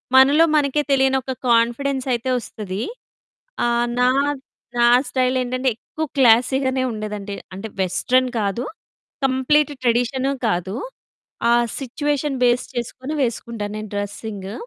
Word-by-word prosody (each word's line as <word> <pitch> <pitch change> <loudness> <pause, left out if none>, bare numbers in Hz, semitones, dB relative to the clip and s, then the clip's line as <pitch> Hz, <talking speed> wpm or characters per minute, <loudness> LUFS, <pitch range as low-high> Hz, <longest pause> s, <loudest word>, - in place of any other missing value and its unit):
మనలో 280 +5 +7
మనకే 295 0 +2
తెలియని 265 0 +3
ఒక 260 +1 -4
కొ‌ఇన్ఫిడెన్స్ 245 +3 +2
అయితే 240 +2 -2
ఓస్తది. 205 -2 -5 0.8
ఆహ్, 235 0 +1
నా 250 0 +5 0.7
నా - - +5 0.3
స్టైల్ 255 0 +1
ఏంటంటే, 255 +1 0
ఎక్కువ 315 +6 -5
క్లాసీ 245 +1 +5
గనే 260 0 +1
ఉండేదంటే 210 -2 -5 0.2
అంటే 210 +3 -6
వెస్టర్న్ 255 +7 +2
కాదు, 205 +5 -1 0.6
కంప్లీట్ 290 +3 +2
ట్రెడిషను 250 +3 +1 0.2
కాదు. 180 +2 -2 0.8
ఆ - - +6 0.3
సిట్యుయేషన్ 290 +1 -2
బేస్ 240 +1 +2
చేసుకొని 255 +4 -4
వేసుకుంటాను 225 -3 -3
నేను 215 0 -6
డ్రెసింగు. 205 -1 -5
250 Hz, 120 wpm, -21 LUFS, 220-265 Hz, 0.8 s, మనలో